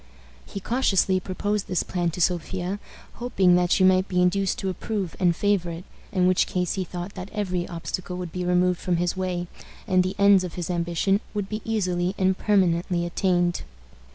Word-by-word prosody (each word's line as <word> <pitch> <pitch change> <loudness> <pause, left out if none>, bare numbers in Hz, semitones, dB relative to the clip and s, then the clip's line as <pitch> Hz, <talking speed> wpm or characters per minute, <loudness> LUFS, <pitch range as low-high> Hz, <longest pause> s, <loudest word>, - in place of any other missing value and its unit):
He 200 - -6
cautiously 195 -4 +2
proposed 205 +3 -2
this 180 -3 0
plan 175 -2 -1
to 175 +2 -5
Sophia, 180 +3 -1 0.4
hoping 195 -7 +3
that 175 0 +2
she 190 - +4
might 185 0 +4
be 180 - 0
induced 185 +2 +2
to 195 - -2
approve 190 -1 -3
and 175 -3 +3
favor 200 -2 +1
it, 165 +1 -6 0.3
in 185 -3 +2
which 185 0 +3
case 180 -2 -1
he 190 - -2
thought 180 +2 -6
that 185 0 -7
every 185 -4 -2
obstacle 180 +1 -5
would 180 -2 -5
be 180 +1 -3
removed 180 0 +2
from 180 -2 0
his 175 +1 0
way, 180 -2 -2 0.4
and 185 0 +3
the 185 +1 -3
ends 200 -2 +6
of 180 - -6
his 175 0 -3
ambition 175 +3 +1 0.2
would 205 -2 -2
be 215 0 -4
easily 185 -4 0
and 190 0 +2
permanently 175 -3 +1
attained. 175 0 +1
185 Hz, 185 wpm, -25 LUFS, 175-195 Hz, 0.4 s, ends